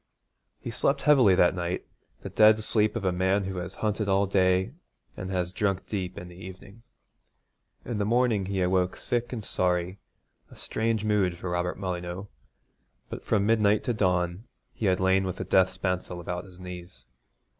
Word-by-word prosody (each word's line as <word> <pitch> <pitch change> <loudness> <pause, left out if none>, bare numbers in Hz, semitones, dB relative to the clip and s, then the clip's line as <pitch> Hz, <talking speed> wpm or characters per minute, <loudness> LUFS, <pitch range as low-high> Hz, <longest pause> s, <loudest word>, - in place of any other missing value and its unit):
He 120 - -6
slept 140 +4 0
heavily 130 -10 +6
that 90 - +4
night, 90 0 -3 0.4
the - - -6
dead 110 0 +6
sleep 105 0 +1
of 110 -4 -3
a 95 - +3
man 95 +3 +1
who 95 -1 -4
has 90 +2 -5
hunted 105 0 -1
all 100 +1 +3
day 95 +3 +2 0.4
and 95 - -6
has 90 -1 -2
drunk 100 -2 -1
deep 95 -4 -4
in 90 - -7
the 90 - -12
evening. 95 +4 -11 1.0
In 115 -3 -3
the - - +1
morning 115 -4 +2
he 95 -2 0
awoke 90 0 +1
sick 120 0 -2
and 110 -5 -5
sorry, 90 +1 -1 0.5
a - - -15
strange 110 -1 -2
mood 100 -5 +1
for 90 0 -5
Robert 90 0 -1
Molyneux; 90 0 -4 0.8
but - - -7
from 100 -2 +1
midnight 105 -1 +3
to 120 - 0
dawn 90 -1 0 0.3
he 110 - -2
had 95 -1 +2
lain 95 +1 +3
with 95 -1 -3
the - - -4
death 95 -1 +4
spancel 90 -1 -3
about 90 +1 -5
his 90 -1 -15
knees. 90 -7 -10
95 Hz, 175 wpm, -27 LUFS, 90-105 Hz, 1.0 s, heavily